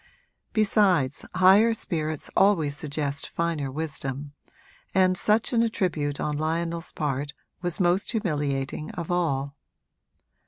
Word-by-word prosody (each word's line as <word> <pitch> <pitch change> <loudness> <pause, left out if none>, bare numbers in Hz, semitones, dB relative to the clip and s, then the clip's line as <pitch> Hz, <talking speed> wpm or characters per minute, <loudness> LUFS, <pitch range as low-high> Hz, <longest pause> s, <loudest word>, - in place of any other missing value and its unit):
Besides, 195 - +2
higher 195 +5 +6
spirits 155 -6 -3
always 165 -8 +3
suggest 145 0 -3
finer 165 -5 -2
wisdom, 140 -1 -4 0.6
and 185 -1 +4
such 215 +6 +2
an 230 - +4
attribute 165 -10 -1
on 150 -1 -2
Lionel's 165 +2 -2
part 145 -1 -2 0.3
was 175 0 0
most 180 +1 +2
humiliating 150 - -2
of 175 -4 -5
all. 140 -5 0
160 Hz, 110 wpm, -26 LUFS, 145-185 Hz, 0.6 s, higher